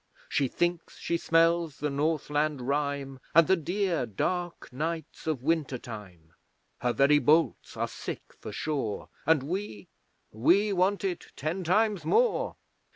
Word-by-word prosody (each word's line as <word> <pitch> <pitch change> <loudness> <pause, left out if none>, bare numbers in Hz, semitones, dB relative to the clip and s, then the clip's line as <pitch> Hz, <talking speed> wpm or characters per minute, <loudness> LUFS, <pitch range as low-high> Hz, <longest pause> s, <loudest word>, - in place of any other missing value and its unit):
She 140 - +1
thinks 175 +5 -2
she 170 - -1
smells 165 -2 +2
the 150 -1 -2
Northland 150 0 0
rime, 140 0 -2 0.2
And 165 0 +8
the 190 - +4
dear 175 -4 -1
dark 175 - -3
nights 160 +3 -4
of 145 -6 -1
winter 155 -4 0
time. 95 -9 -10 0.5
Her 125 - +1
very 140 +3 +4
bolts 155 +2 +2
are - - 0
sick - - -6 0.2
for - - -7
shore, 135 -9 -3 0.2
And 160 -4 +4
we 155 - -4 0.4
we 190 - +3
want 195 +2 +2
it 185 -3 -2
ten 160 +6 -3
times 205 +3 +2
more! 485 +2 +2
155 Hz, 140 wpm, -28 LUFS, 140-175 Hz, 0.5 s, And